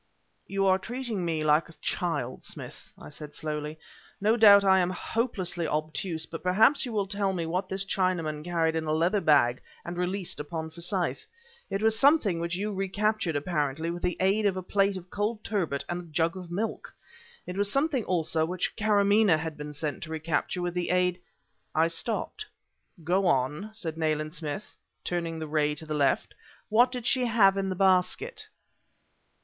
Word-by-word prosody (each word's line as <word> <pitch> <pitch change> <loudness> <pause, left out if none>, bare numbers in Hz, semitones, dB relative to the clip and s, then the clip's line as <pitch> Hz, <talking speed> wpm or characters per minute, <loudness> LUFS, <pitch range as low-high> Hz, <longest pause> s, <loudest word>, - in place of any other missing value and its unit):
"You 195 0 0
are 190 0 +4
treating 235 -2 -4
me 160 -2 -1
like 155 +2 +3
a - - -11
child, 145 -8 -3
Smith," - - -9
I 75 - -11
said 150 - -8
slowly. 150 0 -4 0.4
"No 215 +3 +3
doubt 205 -3 +8
I 190 -1 +6
am 180 -1 +2
hopelessly 185 -4 -2
obtuse, 155 +2 -2
but 165 0 -8
perhaps 220 +10 +4
you - - -5
will 205 -3 0
tell 195 0 -1
me 170 -3 -2
what 180 +3 -2
this 190 0 -1
Chinaman 175 -6 -1
carried 165 -1 0
in 160 -1 -1
a 155 - 0
leather 175 +6 +2
bag 130 -7 +4 0.2
and 175 +1 -5
released 180 +1 -2
upon 160 +2 -5
Forsyth. 175 +2 -2 0.4
It 195 +2 -2
was 220 0 +3
something 270 - +4
which 170 +1 -2
you 205 +3 -2
recaptured, 195 -2 0
apparently 150 0 -1
with 175 0 -6
the 180 - -1
aid 200 +3 +3
of 190 -2 0
a 185 - -4
plate 195 +1 +1
of 180 0 -11
cold 210 +1 -2
turbot 170 -10 -1
and 175 0 -3
a 170 -2 -14
jug 165 +2 +1
of 180 -2 -8
milk! 205 +6 -4 0.5
It 180 - -6
was 200 +1 0
something, 275 -2 +1
also, 160 -3 +1
which 175 +2 -2
Karamaneh 205 -3 +4
had 160 0 -4
been 150 0 -7
sent 150 0 -3
to 165 - -7
recapture 160 +3 -1
with 175 -1 -2
the 180 -1 -2
aid 180 0 +2 0.3
" - - -42
I 160 +1 +4
stopped. 220 +8 -3 0.6
"Go 185 +4 +2
on," 150 +7 0
said 165 -6 -4
Nayland 155 -1 -1
Smith, 165 +4 -6 0.3
turning 170 -2 -2
the 160 - -4
ray 150 -1 +1
to 160 - -6
the 155 - -4
left, 145 -2 +1 0.4
"what 240 +4 +5
did 250 -3 -5
she 255 0 +2
have 215 -5 +5
in 195 -1 -1
the 185 - -2
basket?" 190 - +1
180 Hz, 185 wpm, -28 LUFS, 160-200 Hz, 0.6 s, doubt